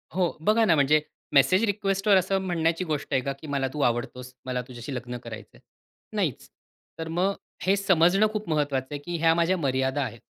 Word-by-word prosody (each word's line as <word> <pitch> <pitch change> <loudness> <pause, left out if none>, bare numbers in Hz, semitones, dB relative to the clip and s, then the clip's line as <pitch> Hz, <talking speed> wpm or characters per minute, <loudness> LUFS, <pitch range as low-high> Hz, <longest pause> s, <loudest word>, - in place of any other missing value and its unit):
हो 180 -3 +2
बघा 220 +5 +3
ना, 170 -6 +4
म्हणजे 150 +1 +4 0.3
मेसेज 145 +9 +5
रिक्वेस्टवर 195 -1 +2
असं 190 +1 +1
म्हणण्याची 170 -1 0
गोष्ट 155 -3 -3
आहे 130 - +3
का 140 +2 -2
की 155 - -10
"मला 140 -2 -1
तू 150 - -5
आवडतोस. 125 +1 -1
मला 125 -1 -2
तुझ्याशी 125 +2 -7
लग्न 125 0 -5
करायचं 115 -2 -9
आहे."? - - -21 0.6
नाहीच. - - -2 0.5
तर 160 - -4
मग 195 +2 +2 0.3
हे 190 +1 +4
समजणं 195 +1 +4
खूप 215 -3 -4
महत्त्वाचं 145 -4 0
आहे, 145 - -3
की 175 -1 -3
ह्या 165 0 +4
माझ्या 170 +2 +2
मर्यादा 135 -2 0
आहेत. 115 - -6
160 Hz, 190 wpm, -26 LUFS, 130-185 Hz, 0.6 s, मेसेज